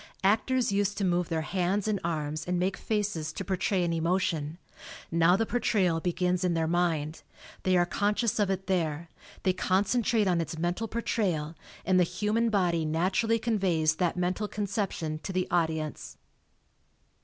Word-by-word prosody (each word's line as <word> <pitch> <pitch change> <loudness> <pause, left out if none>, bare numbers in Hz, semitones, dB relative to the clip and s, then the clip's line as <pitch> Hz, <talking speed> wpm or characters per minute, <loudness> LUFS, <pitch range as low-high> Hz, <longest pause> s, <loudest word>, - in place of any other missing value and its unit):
Actors 225 +5 +2
used 200 0 0
to 200 - 0
move 175 -1 +1
their 160 -1 -1
hands 190 +4 0
and 210 -2 0
arms 155 -1 -3
and 180 0 0
make 185 +2 0
faces 205 -8 -2
to 195 - -6
portray 185 0 0
an 170 -1 0
emotion; 165 -2 0 0.5
now 170 +2 +4
the 225 - +1
portrayal 195 -8 +1
begins 180 +1 0
in 175 -2 +1
their 165 -1 +1
mind; 165 -2 0 0.4
they 185 -1 +2
are 175 - +4
conscious 210 +5 0
of 205 -2 +2
it 190 0 -2
there, 170 -3 -1 0.3
they 185 - +3
con 185 +1 +2
centrate 230 -1 +2
on 175 -3 +2
its 165 0 -5
mental 175 +7 -1
portrayal, 185 -9 -1 0.3
and 185 0 +4
the - - +6
human 210 +6 0
body 175 -6 +1
naturally 185 +9 +1
conveys 185 -9 +1
that 180 -1 0
mental 180 +4 -1
conception 195 -7 -3
to 190 - -6
the 185 -1 -1
audi 165 -2 +2
ence. 155 -1 -7
180 Hz, 165 wpm, -28 LUFS, 165-200 Hz, 0.5 s, the